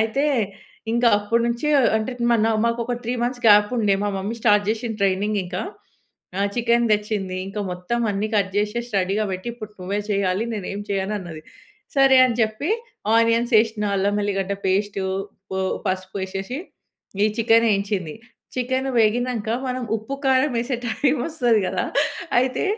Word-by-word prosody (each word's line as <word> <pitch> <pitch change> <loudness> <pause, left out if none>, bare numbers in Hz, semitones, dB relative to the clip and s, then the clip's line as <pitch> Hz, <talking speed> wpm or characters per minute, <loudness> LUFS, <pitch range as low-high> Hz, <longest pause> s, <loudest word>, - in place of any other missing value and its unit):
అయితే 225 +6 +1 0.7
ఇంకా 235 +1 +4
అప్పుడి 230 +3 0
నుంచి 235 +4 -2
అ - - +5 0.2
అంటే 220 +4 -2 0.2
మ - - +5
నా - - +2
మాకు 235 0 0
ఒక 245 +1 -2
3 235 - -1
మంత్స్ 245 +1 -2
గ్యాప్ 205 -1 +6
ఉండే. 210 -4 +3
మా - - +1
మమ్మీ 195 +4 -3
స్టార్ట్ 210 -3 +3
జేషింది 225 0 -2
ట్రైనింగ్ 200 +2 +1
ఇంక. 180 0 -6 0.8
ఆహ్, 200 +1 +1
చికెన్ 235 0 +2
తెచ్చింది 210 -3 -1
ఇంకా 200 +2 -5
మొత్తం 180 +7 -3
అన్నీ 205 +2 -1
కట్ 195 -2 +1
చేషేసి 235 +4 -1
రెడీగా 195 +3 0
పెట్టి, 185 +5 -5
ఇప్పుడు 215 -3 -9
నువ్వే 200 +3 -2
చేయాలి 200 +1 +1
నేనేం 200 0 -4
చేయనన్నది. 190 -5 -3 0.5
సరే 270 -1 +6
అని 235 -3 -2
చెప్పి 220 - -1 0.5
ఆనియన్స్ 230 +1 +2
ఏషిన 220 -1 -2
అల్లం 200 +1 +1
ఎల్లిగడ్డ 195 -1 -1
పేస్టు, 195 +1 0 0.3
ఉప్పు, 190 0 -6 0.3
పసుపు 185 +1 -3
ఏషేసి 195 +7 -5 0.7
ఈ - - +5
చికెన్ 230 0 +4
ఏయించింది. 195 -5 -2 0.4
చికెన్ 260 +1 -1
వేగినంక 230 0 +1 0.2
మనం 255 0 -2
ఉప్పు, 220 +5 -6
కారం 265 +1 +3
యేసే 240 +2 -1
టైమ్ 270 +4 +1
వస్తది 245 -9 +2
కదా! - - -1 0.6
అయితే 255 0 0
215 Hz, 155 wpm, -22 LUFS, 200-240 Hz, 0.8 s, గ్యాప్